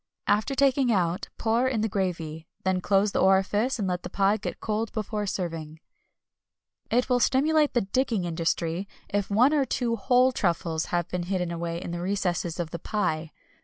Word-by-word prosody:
After 215 +7 +1
taking 270 -2 +3
out 180 -2 0
pour 230 +3 +1
in 245 -5 0
the 220 - +1
gravy, 165 -5 -3 0.2
then 190 -1 +1
close 200 +2 +2
the - - 0
orifice 205 +6 +3
and 205 -4 -1
let 180 -1 -1
the - - -7
pie 200 +1 +2
get 195 - -5
cold 220 +1 -2
before 210 -1 -3
serving. 165 -4 -4 1.1
N.B. 235 - +1
It 250 - +2
will 250 -1 +2
stimulate 295 +4 +3
the 240 - +4
digging 225 0 0
industry 165 +2 -1 0.2
if 200 -1 -1
one 245 +8 +4
or 290 -2 +3
two 240 -3 -1
whole 250 +4 +4
truffles 170 -7 -1
have 175 -1 -1
been 175 -1 -3
hidden 180 -3 -1
away 170 0 -3
in 175 - -6
the 175 0 -4
recesses 180 -3 -1
of 165 -2 -3
the 170 - -5
pie. 160 -6 -2
195 Hz, 185 wpm, -26 LUFS, 175-230 Hz, 1.1 s, the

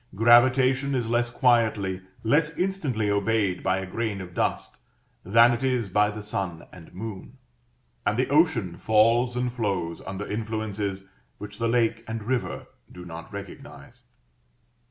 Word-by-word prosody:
Gravitation 130 +4 +4
is 120 -2 0
less 120 +1 +1
quietly, 110 -7 +1 0.2
less 150 +7 +3
instantly 155 - -1
obeyed 100 -2 0
by 95 0 +1
a 95 - -4
grain 105 +1 -3
of 90 -2 -9
dust - - -2 0.4
than 115 +5 +5
it 120 +2 -3
is 125 -5 0
by 105 +2 +3
the 105 0 -7
sun 95 -5 -4
and 85 -3 -13
moon; 110 +5 -8 0.7
and 105 - 0
the 130 - +1
ocean 140 - +2
falls 115 +4 +3
and 125 0 -1
flows 95 -8 -2
under 95 +2 -5
influences 105 -3 -3 0.3
which 105 0 -9
the 115 - 0
lake 115 -1 +1
and 110 -1 -5
river 115 -6 -2 0.3
do 90 0 -10
not 80 -1 -9
recognize. 100 -2 -10
110 Hz, 145 wpm, -25 LUFS, 100-120 Hz, 0.7 s, than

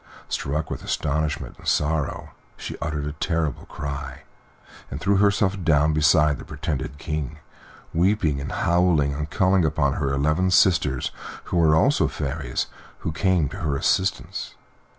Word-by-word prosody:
Struck 75 +3 -2
with - - -5
astonishment 75 0 -2
and - - -11
sorrow, 75 -1 0 0.3
she - - -6
uttered 75 -2 -3
a 75 - -2
terrible 80 0 -2
cry, 70 -1 -6 0.7
and - - -5
threw 100 0 +2
herself 100 -1 +2
down 75 -1 +3
beside 75 -2 +4
the - - -8
pretended 75 -2 -4
King, 75 -1 -4 0.6
weeping, 85 -5 +2
and 70 - -5
howling, 85 -5 +2
and 75 +2 -4
calling 95 -1 +3
upon 75 -3 +1
her 70 -2 -1
eleven 75 +7 +1
sisters, 85 -8 +3 0.3
who - - -2
were 80 -2 +5
also 140 - +3
fairies, 70 -3 -3
and - - -21
who - - -2
came 90 -1 +2
to 100 - -8
her 75 -6 -1
assistance. 95 +7 -1
75 Hz, 150 wpm, -24 LUFS, 75-90 Hz, 0.7 s, were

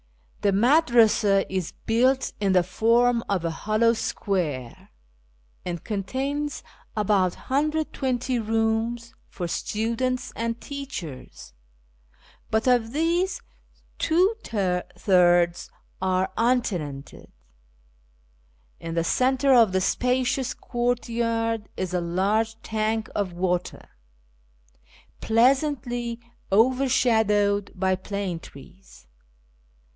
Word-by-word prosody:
I'lie 205 - +4
Madvasa 230 -5 +4
is 185 -3 -3
built 255 +4 +2
in 195 -2 +1
the 180 -1 +4
furm 230 +6 +2
o|' 200 - +2
;i - - +2
liollow 215 +7 +1
square, 155 - -3 0.7
and 175 -2 -5
contains 270 +8 -3 0.3
about 195 -4 +2
120 265 -4 -1
rooms 225 +1 -1 0.2
for 175 -3 -5
students 230 +7 -2
and 230 0 -3
teachers, 190 - -8 1.0
but 220 0 0
of 245 -2 +2
these 340 +5 0 0.6
two 360 +6 +3
thirds 180 -3 +1 0.3
arc 185 0 0
untenanted. 185 - -2 1.5
In 165 0 -6
llic 165 0 0
centre 265 +6 +2
of 230 -5 +6
the 190 0 +1
spacious 255 +4 0
courtyard 230 -2 -1
is 185 -1 -3
a 180 - 0
large 205 +6 0
tank 220 0 -1
of 195 -4 -2
water, 180 0 -2 1.3
pleasantly 240 -1 +1 0.3
overshadowed 220 -4 +2
by 190 0 +1
plane 190 -2 -4
trees. 180 - -15
225 Hz, 90 wpm, -25 LUFS, 185-245 Hz, 1.5 s, of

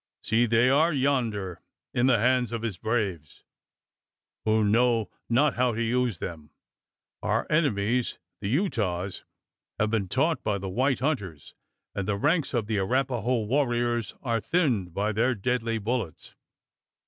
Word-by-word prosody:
See! 115 +2 +2
they 115 +2 +4
are 150 +6 +4
yonder 120 - 0 0.3
in 120 +1 +2
the 130 -3 +5
hands 125 +1 +2
of 115 -1 -4
his 105 -6 -3
braves, 100 - -2 1.0
who 110 0 +3
know 115 +1 +2 0.2
not 140 +6 +3
how 125 -2 +1
to 115 - 0
use 120 -3 0
them. 80 -3 -7 0.7
Our - - 0
enemies 125 -6 +1 0.2
the - - -4
Utahs 105 - -1 0.5
have 105 0 +1
been 105 -4 0
taught 150 - +1
by 105 -2 0
the 95 0 -5
white 130 +6 +1
hunters; 100 - -3 0.4
and 100 -1 -3
the 105 -1 0
ranks 150 - +1
of 115 -3 0
the 105 -1 -1
Arapaho 125 +2 0
warriors 120 -2 0
are 115 -4 0
thinned 120 - +1
by 105 +2 0
their 120 +4 +1
deadly 115 +1 -1
bullets. 110 - -3
115 Hz, 145 wpm, -27 LUFS, 105-130 Hz, 1.0 s, the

